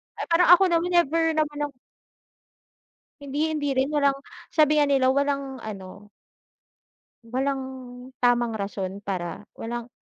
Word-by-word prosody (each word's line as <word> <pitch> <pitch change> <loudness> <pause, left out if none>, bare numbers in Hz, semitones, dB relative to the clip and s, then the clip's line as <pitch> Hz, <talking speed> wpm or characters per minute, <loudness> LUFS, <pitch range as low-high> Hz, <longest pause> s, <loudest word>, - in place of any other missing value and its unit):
Ah, - - -5
parang 340 +2 +5
ako 385 - +2
naman 335 +1 +2
never 325 -1 +2
naman 300 -1 -1
ako 280 -3 -18 1.4
Hindi, 290 +3 -1
hindi 300 -2 -2
rin 265 +2 +1
walang 285 -2 +2 0.4
sabi 305 -1 +4
nga 295 - +5
nila 270 -2 +3
walang 280 0 0
ano 200 0 -9 1.2
walang 265 +3 -1 0.6
tamang 240 -1 +2
rason 200 -2 -4
para 185 -3 -4 0.2
walang 240 +1 -5
275 Hz, 125 wpm, -25 LUFS, 230-300 Hz, 1.4 s, parang